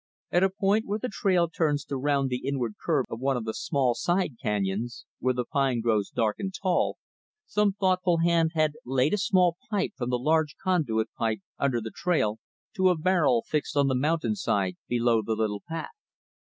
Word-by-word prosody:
At 175 - +3
a 190 - +4
point 200 +2 +1
where 205 +1 -1
the 250 +2 -4
trail 180 -4 +2
turns 150 -3 0
to 140 - -4
round 140 0 0
the 125 - -2
inward 125 -5 -1
curve 150 -7 +1
of 115 - -6
one 135 0 +1
of 115 - -4
the 110 - -2
small 130 +1 +1
side 175 +1 0
canyons 105 +3 -2
where 130 0 +1
the 125 -1 -1
pines 135 -5 0
grow 110 -3 +3
dark 110 -2 +1
and 195 -1 -3
tall 185 -2 0 0.5
some 210 -1 +1
thoughtful 185 -3 +2
hand 165 -1 +2
had 155 -1 +3
laid 130 +5 +1
a - - +3
small 180 -3 +3
pipe 205 -3 0
from 120 -1 -3
the 125 - +1
large 155 +3 +1
conduit 135 -13 0
tunnel, 115 -1 +1 0.2
under 130 -4 +1
the 110 0 -6
trail, 110 - 0 0.4
to 190 -1 +4
a 180 - +2
barrel 155 -8 +2
fixed 150 -1 -2
on 140 -1 +4
the - - +1
mountainside 145 - 0
below 120 -2 +2
the 110 +1 -2
little 105 -2 -1
path. 165 0 -4
145 Hz, 195 wpm, -27 LUFS, 120-180 Hz, 0.5 s, a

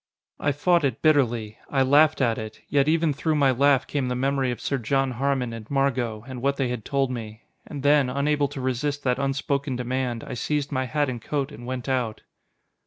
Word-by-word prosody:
I 145 - +1
fought 170 +4 +2
it 140 - -1
bitterly. 120 -8 +2
I 135 -2 +2
laughed 150 +3 +4
at 115 -3 +2
it, 110 0 -8
yet 140 0 +2
even 160 -1 +2
through 155 +3 0
my 140 -3 +4
laugh 135 +1 +3
came 140 -3 -2
the 125 - -1
memory 135 0 0
of 120 - -3
Sir 140 - -1
John 135 +3 0
Harmon 130 -1 -1
and 110 -2 -9
Margot, 125 -6 0
and 130 -2 -7
what 140 +1 +1
they 135 -3 0
had 120 -3 -4
told 135 -2 0
me. 110 -2 -7 0.2
And 145 -3 -7
then, 145 -2 +4
unable 145 +2 +1
to 140 -1 -7
resist 140 +3 -2
that 125 -2 +1
unspoken 140 0 -1
demand, 125 -1 -2
I - - -6
seized 145 +4 -2
my 130 -2 0
hat 150 +2 0
and 120 -3 -4
coat 140 +3 -2
and 120 -4 -10
went 130 0 -4
out. 125 -5 -1
135 Hz, 210 wpm, -25 LUFS, 125-145 Hz, 0.2 s, laughed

